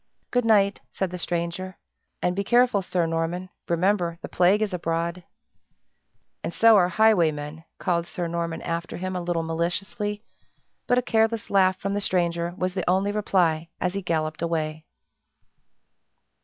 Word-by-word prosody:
"Good 245 -1 +1
night," 200 -3 +3
said 190 -2 -2
the 180 - -5
stranger, 175 +2 -3 0.5
"and 180 0 +1
be 200 - -1
careful, 240 -1 +3
Sir 180 -2 0
Norman 165 +3 -2 0.2
remember, 170 0 +1
the - - -4
plague 190 +4 +3
is 205 -3 -3
abroad." 170 0 -2 1.2
"And - - -2
so 225 +4 +6
are 180 -3 +4
highwaymen!" 165 -7 +2
called 170 -2 0
Sir 175 - -3
Norman 170 -1 -3
after 170 0 -3
him, 185 +1 -4
a 180 - -2
little 170 -1 -1
maliciously; 195 +6 -2 0.6
but 245 - +3
a 250 - +2
careless 225 -1 +1
laugh 190 -2 +4
from 195 0 -2
the 205 - -1
stranger 170 -2 0
was 185 -1 -1
the 185 -2 -2
only 190 +2 +2
reply 175 -6 +1
as 180 0 -1
he 200 - -2
galloped 155 -3 -2
away. 160 -2 -2
180 Hz, 155 wpm, -25 LUFS, 170-200 Hz, 1.2 s, so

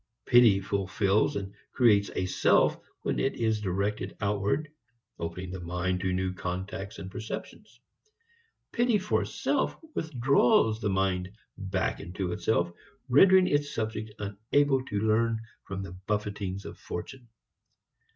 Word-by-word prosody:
Pity 120 -5 +6
fulfils 100 +1 +1
and 100 -1 -4 0.2
creates 105 -5 +4
a 95 - 0
self 90 - +3 0.3
when - - -1
it 135 - 0
is 110 -2 0
directed 100 +2 -2
outward, 105 +8 0 0.5
opening 85 +2 -5
the 95 - -5
mind 90 +1 -2
to 95 0 -1
new 95 0 -1
contacts 95 +3 -5
and 95 0 -8
receptions. 115 +1 -7 0.9
Pity 240 -2 +3
for 205 +1 0
self - - -1 0.2
withdraws 125 -6 +3
the 105 - 0
mind 95 -1 0 0.2
back 95 -1 -2
into 90 0 -4
itself, 85 -2 0 0.4
rendering 185 +8 +7
its 145 -3 0
subject 110 -1 -3
unable 120 +7 +1
to 100 -5 -2
learn 110 +1 +2 0.3
from 95 0 -5
the 95 - -7 0.2
buffetings 100 -2 -2
of - - -9
fortune. 120 +8 -7
100 Hz, 130 wpm, -28 LUFS, 95-115 Hz, 0.9 s, rendering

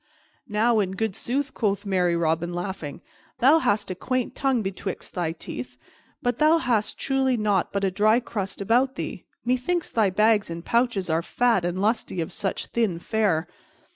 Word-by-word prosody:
"Now, 220 +2 +3
in 190 -2 0
good 215 0 -2
sooth," 270 +3 -1
quoth 205 -2 -1
merry 180 -3 +2
Robin, 170 +1 0
laughing, 175 -5 -5 0.4
"thou 285 +6 +6
hast 205 -8 0
a - - 0
quaint 255 +6 -2
tongue 265 -5 +1
betwixt 190 -1 -5
thy 175 -3 -1
teeth. 125 -6 -7 0.5
But 245 0 0
hast 305 -9 +3
thou - - -25
truly 265 -2 +1
nought 205 -4 +1
but 200 0 -2
a 190 - +2
dry 215 +4 +4
crust 200 -5 -5
about 250 +6 +2
thee? - - -5 0.2
Methinks 255 +8 0
thy 215 -4 +3
bags 210 +1 +3
and 170 +1 -6
pouches 235 -5 +1
are 160 +1 +2
fat 230 +1 +1
and 175 +1 -2
lusty 215 -4 0
for - - -8
such 195 - -3
thin 220 -7 0
fare." 180 -4 0
210 Hz, 170 wpm, -25 LUFS, 185-245 Hz, 0.5 s, thou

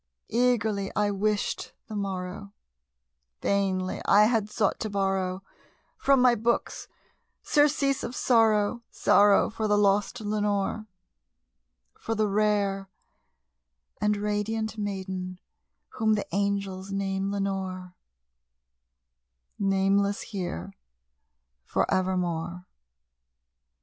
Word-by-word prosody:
Eagerly 220 -4 +1
I 205 0 +2
wished 205 +1 -1
the 215 - -8
morrow; 195 0 -4 0.9
vainly 190 -2 0
I 205 +1 +6
had 215 -2 +2
sought 210 -2 0
to 220 - -3
borrow 195 -1 -1 0.5
From 275 -1 +3
my 250 -1 +6
books 235 +1 -1 0.6
surcease 280 -2 +2
of 245 - -5
sorrow 225 -1 +3
sorrow 205 0 +4
for 220 0 -2
the 210 0 +3
lost 200 0 +2
Lenore 210 0 -1 1.1
For 225 - -3
the 215 0 +1
rare 200 -1 +1 1.1
and 210 0 +2
radiant 210 +2 -2
maiden 190 -3 -4 0.5
whom 220 -1 +1
the 205 - -2
angels 195 0 -2
name 195 0 -1
Lenore 190 -2 -3 1.7
Nameless 195 +1 +2
here 175 - -5 0.9
for - - 0
evermore. 180 -2 -1
200 Hz, 95 wpm, -27 LUFS, 195-215 Hz, 1.7 s, I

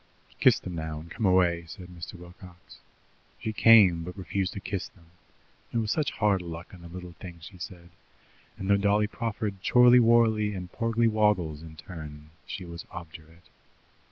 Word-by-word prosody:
"Kiss - - +6
them 90 - -7
now, 80 -2 -4
and 80 +1 -12
come 110 -4 0
away," 90 -2 +3
said 90 +4 -10
Mr. 85 0 -9
Wilcox. 90 0 -14 0.6
She 110 - -4
came, 100 -7 +6
but 90 +3 -8
refused 95 -1 -2
to - - -5
kiss 95 -1 -4
them: 85 -3 -23 0.7
it - - -2
was 110 -1 0
such 155 -2 0
hard 105 -3 +2
luck 85 +1 -8
on 90 - -12
the 85 - -10
little 90 +1 -9
things, 85 -3 -10
she 90 +3 -12
said, 85 0 -9 0.7
and 95 - -5
though 100 0 +4
Dolly 100 +1 +2
proffered 105 -3 -4
Chorly 125 0 +6
worly 110 -3 +3
and 90 -1 -7
Porgly 115 0 +1
woggles 105 -9 +1
in 80 -1 -11
turn, 75 -3 -10 0.2
she 95 - -6
was 85 -1 -8
obdurate. 80 0 -11
90 Hz, 175 wpm, -27 LUFS, 85-105 Hz, 0.7 s, Kiss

